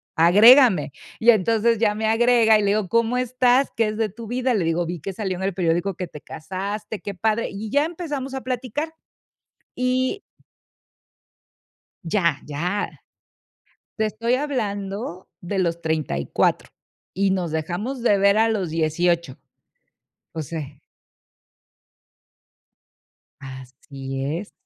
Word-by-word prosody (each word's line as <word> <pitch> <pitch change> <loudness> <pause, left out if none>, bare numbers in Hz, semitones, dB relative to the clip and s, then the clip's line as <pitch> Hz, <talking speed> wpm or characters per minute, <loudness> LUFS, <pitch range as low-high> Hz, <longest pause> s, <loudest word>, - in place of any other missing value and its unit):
agrégame". 200 - +6 0.3
Y 235 - +4
entonces 225 +2 +3
ya 210 -1 +2
me 220 +1 -2
agrega 225 -1 +4
y - - 0
le 200 - +1
digo: 210 -4 0
"¿Cómo 230 +1 +1
estás? 255 +1 +2
¿Qué 225 -2 +2
es 215 - -5
de 220 -2 0
tu 230 +4 -10
vida?". 250 +1 0
Le 185 -6 0
digo: 165 +1 0
"Vi 175 0 -4
que 195 +6 -6
salió 190 -2 -3
en 190 - -5
el 195 -1 -1
periódico 175 +2 0
que 180 - -5
te 150 - -11
casaste, 195 +6 -6
qué 200 - -5
padre", 220 +4 0
y 210 +2 -6
ya 285 +6 +2
empezamos 295 -6 -5
a 265 - -4
platicar. 255 +5 -3 0.9
Y 255 +9 0 1.8
Ya 170 -4 +1
ya. 175 +8 -2 1.1
Te 220 - +1
estoy 230 +3 0
hablando 205 - -3
de 190 +2 -3
los 170 -2 -1
34 155 - -1 0.4
y 195 +1 +1
nos 180 -4 -1
dejamos 180 - -3
de 210 -4 +3
ver 200 +1 +4
a 225 +1 +4
los 200 -6 -1
18. 165 -1 0 1.0
O 160 - -4
se 145 -2 -7 2.6
Así 135 +1 -7
es. 165 +9 -4
200 Hz, 135 wpm, -23 LUFS, 170-230 Hz, 2.6 s, agrégame